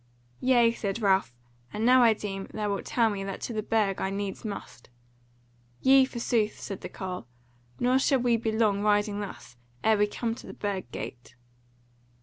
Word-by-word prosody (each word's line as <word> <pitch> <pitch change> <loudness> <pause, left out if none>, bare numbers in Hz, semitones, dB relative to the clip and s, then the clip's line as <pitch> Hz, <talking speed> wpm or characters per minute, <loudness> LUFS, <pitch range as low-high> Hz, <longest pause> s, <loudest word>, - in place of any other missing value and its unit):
"Yea," 240 -3 +4
said 210 -1 -3
Ralph, 195 - +2 0.4
"and 215 +2 -2
now 255 +1 +6
I 230 -2 +6
deem 195 -2 -5
thou 210 -1 -2
wilt 200 - -4
tell 235 -2 +2
me 195 -1 -4
that 195 -1 -5
to 235 - -4
the 215 - -1
Burg 210 -3 0
I 190 - 0
needs 195 0 -4
must." 205 - -7 0.9
"Yea, 265 0 +6
forsooth," 235 -4 -1
said 195 - -6
the - - -6
carle, 180 -9 -6 0.5
"nor 255 +2 +3
shall 270 0 +3
we 240 -1 +3
be 225 -1 -1
long, 215 -2 +2
riding 205 0 +2
thus, 195 -11 -8 0.3
ere 220 -1 +4
we 210 - +4
come 225 +2 -2
to - - -11
the - - -9
Burg 195 - -3
Gate." 120 0 -8
210 Hz, 180 wpm, -28 LUFS, 195-230 Hz, 0.9 s, now